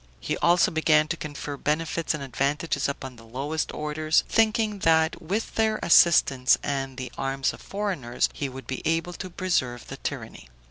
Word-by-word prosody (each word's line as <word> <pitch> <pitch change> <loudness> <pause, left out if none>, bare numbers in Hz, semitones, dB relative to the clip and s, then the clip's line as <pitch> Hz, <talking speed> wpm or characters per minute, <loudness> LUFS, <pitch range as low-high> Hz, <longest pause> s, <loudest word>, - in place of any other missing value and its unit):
He - - -2
also 175 +3 +4
began 155 -1 +3
to 175 - 0
confer 145 -3 -6
benefits 165 +3 -1
and 145 - -6
advantages 140 +4 -1
upon 130 -3 -6
the 115 - -14
lowest 140 +7 -3
orders, 155 +1 +1
thinking 220 -2 +2
that 160 -2 +2
with 200 +7 -3
their 220 -1 +1
assistance, 140 -7 +5
and 135 -2 -3
the 130 -2 -5
arms 135 0 -1
of - - -12
foreigners, 185 - -1
he 140 - -3
would 130 +1 -9
be 130 - -5
able 165 +2 0
to 185 +2 -7
preserve 130 -10 -1
the - - -7
tyranny. - - -6
155 Hz, 170 wpm, -26 LUFS, 135-175 Hz, -, assistance